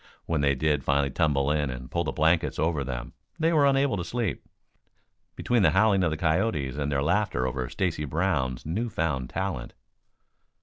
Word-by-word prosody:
When 80 -3 0
they 70 -1 +2
did 75 0 0
finally 70 -1 +1
tumble 70 -1 +1
in 75 -2 0
and 65 +1 -7
pull 85 - 0
the 70 - -2
blankets 80 +3 +1
over 80 -3 0
them 60 -2 -5 0.2
they 165 +1 +2
were 145 -3 +5
unable 135 -5 +2
to 90 - -2
sleep, 115 0 -3 0.9
between 120 -2 +1
the 100 - +5
howling 100 -2 +4
of 85 - +2
the 80 - -3
coyotes 80 - 0
and 75 0 -2
their 70 -1 0
laughter 75 -7 +1
over 65 -1 -3
Stacy 85 -5 -2
Brown's 75 -5 -1
new 105 +10 -2
found 75 - -2
talent. 95 -11 -4
80 Hz, 180 wpm, -27 LUFS, 70-95 Hz, 0.9 s, were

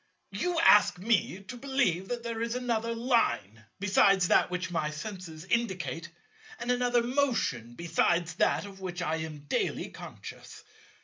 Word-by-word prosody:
You 355 -2 -1
ask 205 - +6
me 195 -1 0
to 225 +6 -8
believe 245 -9 0
that 240 +1 -4
there 230 -1 -4
is 230 +1 -1
another 230 -2 -1
Line 230 - 0
besides 195 -2 +4
that - - +4
which 180 -2 -3
my 160 -3 0
senses 165 0 -7
indicate, 190 -6 -1 0.5
and 245 - -1
another 245 -1 +2
motion 235 - 0
besides 170 +1 +1
that - - +2
of 195 -1 -11
which 175 -1 -4
I 160 -1 0
am 160 -2 -6
daily 145 - -1
conscious. - - -10
195 Hz, 145 wpm, -29 LUFS, 170-235 Hz, 0.5 s, ask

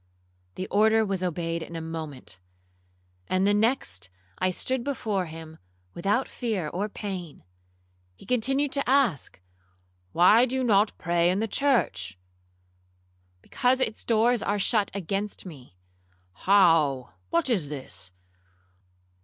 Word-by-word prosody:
The 185 - -4
order 220 +2 +4
was 195 -2 -2
obeyed 170 -2 -2
in 165 +1 -8
a - - -3
moment, 160 -10 -7 0.9
and 185 +1 +1
the 205 - +4
next 205 - 0 0.3
I 185 - +2
stood 255 +7 -1
before 215 -9 -2
him 160 0 -10 0.3
without 205 +9 0
fear 210 - -3
or 200 +6 -3
pain. 185 -7 -6 0.7
He 95 - -16
continued 265 +5 +1
to 280 -3 0
ask, 255 - +1 0.7
'Why 215 +8 +5
do 260 - -3
you 260 - 0
not 210 -3 +3
pray 170 0 +1
in 185 - +1
the 220 +2 0
church?'—'Because 90 - -3
its 225 -4 -2
doors 235 +1 +2
are 205 - 0
shut 205 +1 +2
against 200 +2 -3
me.'—'How? 125 - 0 0.2
what 170 - +1
is 190 - 0
this? 130 -9 -9
185 Hz, 120 wpm, -26 LUFS, 135-220 Hz, 0.9 s, Why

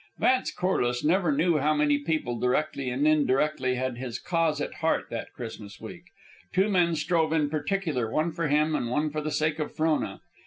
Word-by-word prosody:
Vance 255 0 +2
Corliss 125 -10 0
never 175 +1 +2
knew 155 +2 +2
how 150 +2 +2
many 145 -1 +2
people, 145 -6 -2
directly 135 +2 0
and 135 +5 +1
indirectly, 145 -3 +2
had 130 -1 -3
his 125 -2 -4
cause 165 0 0
at - - -3
heart 160 - 0
that 115 - -5
Christmas 110 -4 -8
week. - - -10 0.5
Two 195 +3 +2
men 175 -4 +2
strove 160 +1 +1
in 150 -3 +1
particular, 155 - -1
one 155 +7 0
for 165 0 -2
him 150 +2 +2
and 120 -5 -1
one 150 +4 0
for 155 +1 -3
the 155 - -3
sake 155 +1 0
of 150 - -2
Frona. 160 0 0
150 Hz, 190 wpm, -27 LUFS, 130-160 Hz, 0.5 s, Vance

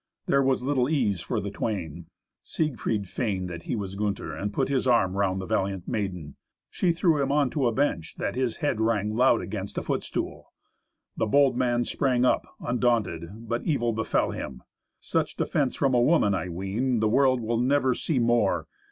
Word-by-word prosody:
There 140 - +3
was 130 -2 +1
little 130 -1 +1
ease 110 - +1
for - - -2
the 100 +1 -4
twain. 100 -7 -4 0.3
Siegfried 115 -9 -2
feigned 95 -4 -2
that 85 -1 -6
he - - +1
was 100 -3 -4
Gunther, 100 0 -3
and 100 +1 -3
put 135 +5 0
his 135 -2 0
arm 95 -7 +3
round 95 -1 +1
the 95 - -4
valiant 95 -1 -1
maiden. 90 -8 -4 0.3
She 180 - +1
threw 165 -3 +2
him 140 0 0
on 145 -3 +2
to 140 -5 +1
a - - +2
bench, 110 - -1
that 100 - -2
his 125 -2 -1
head 135 -7 -1
rang 110 -1 +1
loud 125 0 +4
against 100 -1 -6
a - - -1
foot - - -1
stool. - - -5 0.7
The 110 - +1
bold 140 +2 +4
man 120 -1 +1
sprang 125 -1 +1
up - - +2
undaunted, 115 -4 -1
but 115 +2 -1
evil 120 -7 0
befell 110 0 0
him. 65 -1 -7 0.4
Such - - -1
defence - - 0
from 135 -2 +1
a 120 - +4
woman 125 -7 +3
I 90 -1 -2
ween 100 +8 -1
the 110 - +2
world 130 +2 +3
will 115 0 -1
never 130 +1 +2
see 150 +3 -2
more. 120 -4 +2
115 Hz, 190 wpm, -26 LUFS, 100-130 Hz, 0.7 s, loud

